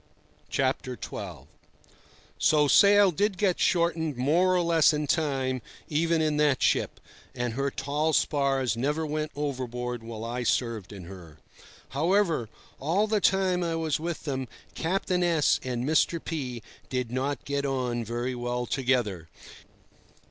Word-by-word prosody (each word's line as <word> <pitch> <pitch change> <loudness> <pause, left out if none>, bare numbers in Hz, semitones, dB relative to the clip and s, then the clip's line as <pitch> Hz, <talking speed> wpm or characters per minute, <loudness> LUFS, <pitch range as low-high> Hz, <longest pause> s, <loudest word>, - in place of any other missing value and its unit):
XII. - - -1 1.4
So 150 -1 +4
sail 200 +6 +6
did 200 +3 0
get 185 -2 +1
shortened 165 -5 +1
more 170 +8 +3
or 180 - +3
less 165 -2 +4
in 150 0 -1
time 135 -4 0 0.3
even 165 +1 +1
in 155 -1 +1
that 150 -3 +2
ship, - - +1 0.4
and 120 -1 -2
her 140 +3 -1
tall 145 +4 -1
spars 135 -5 +1
never 150 +6 -1
went 155 0 -3
overboard 125 -4 -3
while 115 -1 -7
I 120 +2 -3
served 115 -4 -1
in 100 -3 -9
her. 85 -4 -11 0.5
However, 165 - +1 0.3
all 170 +9 +1
the 215 -1 0
time 190 -2 +2
I 165 -1 -1
was 160 -3 -1
with 170 +1 -4
them, 135 -3 -3 0.3
Captain 180 +1 -1
S— 170 -4 +3
and 125 -1 -2
Mr. 160 +3 +2
P— 130 -8 -4 0.3
did 125 -3 -2
not 135 +3 -2
get 140 0 -1
on 125 -4 -1
very 120 +3 -3
well 120 0 -2
together. 120 - 0
140 Hz, 140 wpm, -27 LUFS, 125-165 Hz, 1.4 s, sail